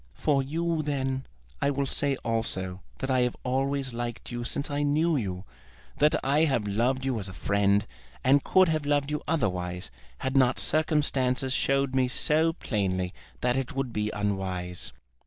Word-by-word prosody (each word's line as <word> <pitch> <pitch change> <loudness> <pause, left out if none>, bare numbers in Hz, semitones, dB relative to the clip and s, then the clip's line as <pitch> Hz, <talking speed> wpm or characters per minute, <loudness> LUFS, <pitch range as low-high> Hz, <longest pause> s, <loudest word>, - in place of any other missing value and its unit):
"For 140 -2 +2
you, 165 +4 -1
then, 135 -3 -2 0.3
I 140 - +3
will 140 0 0
say 140 +1 0
also 95 -5 -1 0.2
that 135 0 -2
I 130 - +3
have 125 -1 +1
always 135 0 0
liked 120 0 -5
you 120 0 -3
since 140 +4 -3
I 145 0 0
knew 155 +3 +2
you; 95 -8 -2 0.6
that 150 +1 +5
I 145 +4 +4
have 135 -8 +1
loved 125 +6 +1
you 130 -4 0
as 95 -2 -4
a - - -9
friend; 100 +2 +2 0.4
and 140 +2 +5
could 185 0 +5
have 155 -2 0
loved 145 0 +1
you 150 - -1
otherwise 90 - -1 0.3
had 130 +1 -3
not 130 -1 +4
circumstances 140 -4 +2
showed 135 0 +1
me 130 -1 +3
so 155 +5 +2
plainly 95 - -1 0.3
that 125 0 +2
it 135 +1 -2
would 135 -3 -2
be 105 0 0
unwise." 95 -4 -3
130 Hz, 170 wpm, -28 LUFS, 105-145 Hz, 0.6 s, that